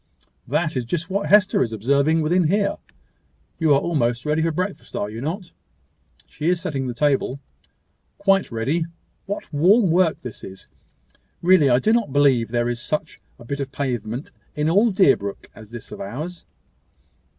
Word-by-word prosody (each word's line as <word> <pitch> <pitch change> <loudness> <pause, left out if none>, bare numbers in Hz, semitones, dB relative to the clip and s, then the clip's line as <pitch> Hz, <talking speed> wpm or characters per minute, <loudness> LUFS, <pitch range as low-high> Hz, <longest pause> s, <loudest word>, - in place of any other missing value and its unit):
"That 160 -2 0
is 125 - -1
just 170 +9 -3
what 200 +1 -1
Hester 205 -1 +5
is 115 - 0
observing 140 +9 +2
within 175 +3 +2
here. 200 +5 +1 0.8
You 160 -3 +2
are - - +4
almost 120 -7 -1
ready 150 +1 +1
for 165 +1 +1
breakfast, 185 +5 -4
are 105 - -2
you 115 +2 -7
not? 170 +6 -4 0.8
She 155 +3 -2
is 180 -1 +2
setting 135 -5 -3
the 120 - -4
table." 140 0 +1 0.8
"Quite 195 -4 +2
ready. 135 +9 -1 0.4
What 200 -5 -5
warm 185 +6 +4
work 175 -1 +2
this 125 -3 -9
is! 95 0 -10 0.8
Really 175 -5 +5
I 120 - +5
do 215 - +2
not 230 - +1
believe 135 -5 +3
there 120 0 0
is 120 -1 -3
such 155 +4 -3 0.2
a 120 - -14
bit 140 +4 -4
of 135 -1 -4
pavement 125 -2 -4 0.2
in 150 +2 +1
all 205 +6 +4
Deerbrook 135 - +1
as 110 -2 -13
this 120 -1 -10
of - - -8
ours." 155 - -6
150 Hz, 170 wpm, -22 LUFS, 120-180 Hz, 0.8 s, Hester